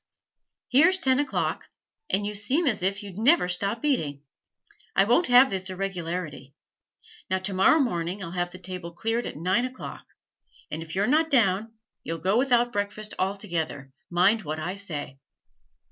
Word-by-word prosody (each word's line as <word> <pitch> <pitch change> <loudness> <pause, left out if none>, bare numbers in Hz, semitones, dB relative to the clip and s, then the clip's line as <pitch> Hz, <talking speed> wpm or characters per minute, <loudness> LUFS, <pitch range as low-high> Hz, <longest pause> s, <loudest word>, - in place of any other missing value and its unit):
Here's 330 +9 +5
ten 265 -6 +2
o'clock, 290 - -1 0.4
and 205 +1 0
you 210 - -3
seem 255 +12 0
as 220 -9 +1
if 195 +3 -1
you'd 200 -1 -8
never 255 - +4
stop 200 +7 -2
eating. 150 - 0 0.7
I 195 - +6
won't 245 - +3
have 250 +2 +7
this 190 -1 -2
irregularity. 175 -7 -4 0.7
Now 190 - +2
tomorrow 190 +9 +3
morning 185 - -1
I'll 170 - -6
have 175 0 -1
the 180 - -11
table 180 -2 -7
cleared 225 +6 -1
at - - -7
nine 185 +9 +1
o'clock, 255 0 -7 0.6
and 155 - -4
if 160 +1 -7
you're 200 +2 +2
not 315 +6 +3
down 225 -4 +2 0.3
you'll 165 - -3
go 185 +6 +1
without 245 -2 +2
breakfast 205 +1 -3
altogether, 170 -8 -3 0.2
mind 185 +6 +3
what 155 -3 -4
I 175 +4 -3
say.' 150 -9 -5
195 Hz, 160 wpm, -26 LUFS, 175-240 Hz, 0.7 s, have